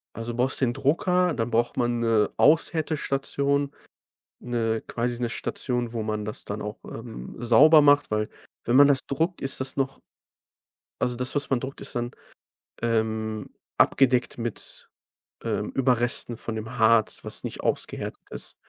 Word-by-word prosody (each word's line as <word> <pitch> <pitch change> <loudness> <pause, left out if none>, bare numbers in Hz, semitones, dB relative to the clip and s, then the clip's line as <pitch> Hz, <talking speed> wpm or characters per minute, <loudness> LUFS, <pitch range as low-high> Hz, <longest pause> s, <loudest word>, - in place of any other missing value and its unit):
Also, 115 +1 -4
du 115 - -7
brauchst 130 +3 +1
den 120 -2 +2
Drucker, 180 +5 +2
dann 115 0 -2
braucht 120 +1 +1
man 120 -1 0
'ne 115 -2 +2
Aushärtestation, 140 -2 +1 0.7
'ne 115 -2 -1
quasi 120 0 -2
'ne 120 - 0
Station, 120 +1 -2
wo 115 -2 -2
man 105 -1 -2
das 105 - -6
dann - - -5
auch, - - -6
ähm, 60 +1 -8
sauber 140 +7 +7
macht, 145 -2 +4
weil 105 0 0 0.4
wenn 120 - +2
man 140 +1 +8
das 140 -1 +4
druckt, 165 +6 -1
ist 135 -1 -2
das 130 0 -3
noch 135 0 -2 1.0
also 125 -1 0
das, 125 +3 -2
was 145 -1 -1
man 135 - +3
druckt, 135 +1 -7
ist - - -9
dann, 120 +1 -2 0.7
ähm, 110 -2 -1 0.3
abgedeckt 125 -3 +3
mit, 115 -2 -6 0.5
ähm, - - -2
Überresten 120 -2 +1
von 115 - -5
dem 110 +3 -6
Harz, 110 -1 +3
was - - -6
nicht - - -6
ausgehärtet - - -3
ist. - - -9
120 Hz, 155 wpm, -26 LUFS, 115-140 Hz, 1.0 s, man